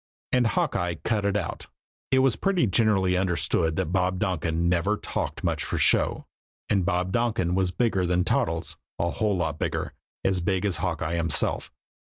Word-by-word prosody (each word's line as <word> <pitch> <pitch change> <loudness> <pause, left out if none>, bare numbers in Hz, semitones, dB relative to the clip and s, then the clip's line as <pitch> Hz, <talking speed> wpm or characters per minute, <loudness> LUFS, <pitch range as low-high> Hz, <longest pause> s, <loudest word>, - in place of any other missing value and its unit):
And 125 -2 +3
Hawkeye 90 -4 0
"cut 105 -3 0
it 100 0 +1
out." 95 - -4 0.4
It 130 0 +4
was 130 - +3
pretty 195 -7 +1
generally 95 -3 +2
understood 85 -3 +1
that 80 - -1
Bob 90 -1 +1
Donkin 85 -3 -1
never 90 +4 +1
talked - - -4
much - - 0
for - - -3
show, - - +2 0.4
and 100 -3 +2
Bob 90 +1 0
Donkin 105 -6 0
was 95 0 +1
bigger 95 -1 0
than 90 0 +2
Toddles, 80 -1 -1 0.2
a 85 0 0
whole 105 0 0
lot 80 -3 -2
bigger, - - -2 0.3
as 95 -2 +2
big 95 +2 0
as 95 -6 +1
Hawkeye 80 -1 -2
himself. 85 -3 0
90 Hz, 170 wpm, -26 LUFS, 85-105 Hz, 0.4 s, It